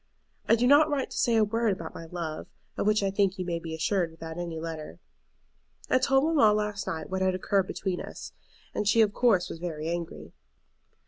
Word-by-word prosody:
I - - +7
do 235 +2 +1
not 290 +4 +6
write 285 -3 -1
to - - -6
say 235 - +3
a 220 - +5
word 225 +1 +1
about 165 -3 -7
my 165 - -8
love, 165 -2 -5 0.3
of - - -1
which 215 -1 +3
I 195 - +1
think 195 -1 +1
you 185 - -3
may 170 -1 -2
be 165 -1 -6
assured 170 +2 0
without 165 +1 -8
any 170 -2 -4
letter. 160 -1 -6 0.9
I 255 - +5
told 270 +1 +3
mamma 295 -10 +4
last 210 -1 -2
night 160 +3 -4
what 190 0 -1
had 185 0 +2
occurred 190 0 +1
between 185 -2 -3
us, - - -9 0.4
and 210 - -2
she 225 +2 +5
of 210 -2 +3
course 200 -8 +3
was 165 - -7
very 160 -2 -4
angry. 170 -1 -5
190 Hz, 210 wpm, -28 LUFS, 165-220 Hz, 0.9 s, I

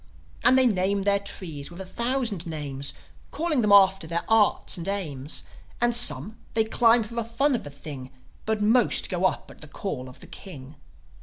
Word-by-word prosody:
And 260 - +5
they 260 - +5
name 200 -2 +1
their 200 0 +2
trees 160 -7 -5
with 175 +1 -12
a 190 - -6
thousand 235 -3 -2
names, 140 -3 -4 0.3
Calling 315 -5 0
them 210 -2 +1
after 195 -3 +5
their 170 +1 -2
Arts 225 -2 +2
and 170 -1 -6
Aims; 155 -8 -3 0.4
And 240 0 +2
some, 225 -2 +3 0.2
they 220 - +4
climb 230 +1 +3
for 215 +2 -10
the 235 0 -2
fun 265 +6 0
of 240 - -2
the 145 - -8
thing, 140 -2 -9 0.4
But 220 -1 0
most 230 +1 +3
go 180 0 0
up - - -1
at - - -17
the 155 - -11
call 135 -5 -6
of 130 - -14
the - - -11
King. 145 -8 -10
200 Hz, 190 wpm, -25 LUFS, 160-230 Hz, 0.4 s, And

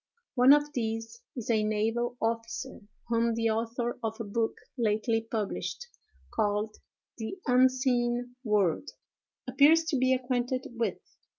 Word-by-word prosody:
One 255 +1 +6
of 295 0 +4
these 225 - -3
is 240 -2 -2
a 220 -2 +3
naval 225 +3 0
officer, 230 +3 -3 0.3
whom 230 0 +1
the 230 -1 +1
author 235 +2 -2
of 225 0 -3
a - - -2
book 225 +2 -1 0.2
lately 225 -1 +1
published, 225 - -3 0.5
called 210 0 0 0.4
"The 220 +12 -4
Unseen 250 -1 +2
World," 210 - +1 0.6
appears 315 +3 +5
to 290 - +1
be 255 +1 +3
acquainted 255 0 -1
with. 235 -1 -1
235 Hz, 125 wpm, -29 LUFS, 225-255 Hz, 0.6 s, One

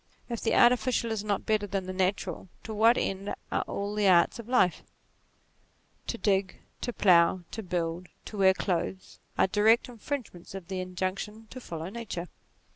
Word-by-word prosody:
If 235 -2 -3
the 225 - +1
artificial 240 -1 +4
is 215 -2 -2
not 205 -2 -1
better 215 -1 +1
than 195 -1 -2
the 185 - -5
natural, 185 -1 -1
to 220 - -6
what 225 +3 +5
end 195 +1 -2 0.2
are - - +1
all 200 +1 -3
the 210 -1 +2
arts 180 +5 +4
of 235 0 -9
life? 190 -8 +3 1.3
To 235 - -2
dig, 195 -3 +1 0.2
to 245 - -2
plough, 180 -4 +4
to 225 - -5
build, 175 -2 -3 0.2
to 210 - -7
wear 190 -1 +5
clothes, 185 +1 -3 0.2
are - - +5
direct 215 +4 +3
infringements 235 -7 -6
of 185 -3 -8
the 185 -1 -2
injunc 185 +1 -3
tion 215 +1 -7
to 255 - -8
follow 165 -4 -6
nature. 195 -6 -6
195 Hz, 175 wpm, -29 LUFS, 185-220 Hz, 1.3 s, what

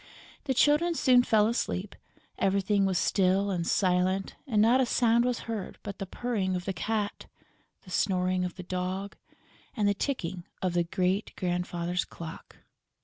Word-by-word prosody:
The 265 -2 0
Children 305 +6 +3
soon 255 -5 +5
fell 215 -3 +3
asleep, 210 -4 -2 0.4
everything 195 +1 +2
was 190 -2 0
still 195 +2 +2
and 170 -3 -2
silent 185 +1 +1
and 220 -5 +1
not 235 +5 +5
a - - +3
sound 235 0 +3
was 250 -1 -1
heard 220 -4 -5
but 200 -1 -7
the 195 - -4
purring 200 -5 -2
of 180 0 -4
the 195 - -2
cat, 210 +1 -2 0.6
the 185 - -13
snoring 185 -1 +1
of 180 -1 -4
the 185 - -8
dog 185 +2 -3 0.6
and 210 -2 +1
the 205 - +3
ticking 190 - -3
of 185 -2 -1
the 175 -1 +1
great 185 +4 -1
grandfather's 175 -1 -1
clock. 165 -1 -10
195 Hz, 160 wpm, -28 LUFS, 180-220 Hz, 0.6 s, soon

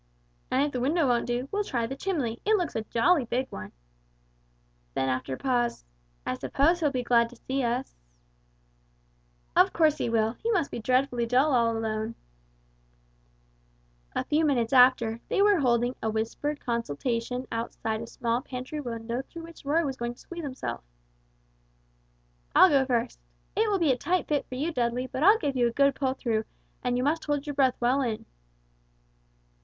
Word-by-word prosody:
"And 265 +2 +2
if 290 - -1
the 255 - -3
window 290 +4 +2
won't 240 -1 +1
do, 245 +2 -2
we'll 410 +1 0
try 240 - -1
the 265 +4 -5
chimney, 275 -9 -2
it 435 +1 +3
looks 355 -6 -1
a 225 - 0
jolly 270 +8 +2
big 255 +3 -2
one." 100 0 -7 1.2
Then 135 - +1
after 130 +1 -2
a - - -12
pause 240 - 0 0.4
"I - - -1
suppose 295 - +1
he'll 310 -3 +2
be 255 -3 -2
glad 235 -1 +3
to 245 - -14
see 265 +3 -3
us?" 245 +2 -1 1.6
"Of - - +5
course 310 -2 +3
he - - 0
will. 225 0 +1
He 455 - -1
must 370 -10 +1
be - - -4
dreadfully 250 0 +1
dull 260 +5 +3
all 230 -2 +2
alone." 220 0 -3 2.0
A - - 0
few 305 +2 +1
minutes 255 -5 +1
after, 250 -3 +5
they - - 0
were 405 -2 +5
holding 245 -2 +2
a 220 - 0
whispered 230 +7 -2
consultation 235 - -2
outside 225 -1 -3
a 230 - -7
small 235 +1 -1
pantry 255 +4 -6
window 235 -2 -4
through 335 -1 -9
which 330 -3 -13
Roy 315 +4 +2
was 265 -2 -3
going 240 0 -3
to - - -22
squeeze 345 -1 -8
himself. 270 -2 -5 1.7
"I'll 375 - +8
go 270 -2 +3
first. 240 -1 -1 0.4
It 440 0 +2
will 405 - +2
be 330 -6 +3
a 250 - +1
tight 360 +7 0
fit 295 -2 0
for 255 - -5
you, 310 +6 -2
Dudley, 245 0 0
but 260 +1 -5
I'll 405 +7 +7
give 285 -11 -2
you 245 -2 +3
a - - -1
good 280 +3 +3
pull 265 -1 -1
through, 220 -4 -1 0.4
and 245 0 0
you 250 - 0
must 315 +4 0
hold 290 -2 -1
your 290 - -4
breath 270 -2 +3
well 250 +3 +2
in." 230 -5 -2
255 Hz, 180 wpm, -27 LUFS, 235-290 Hz, 2.0 s, I'll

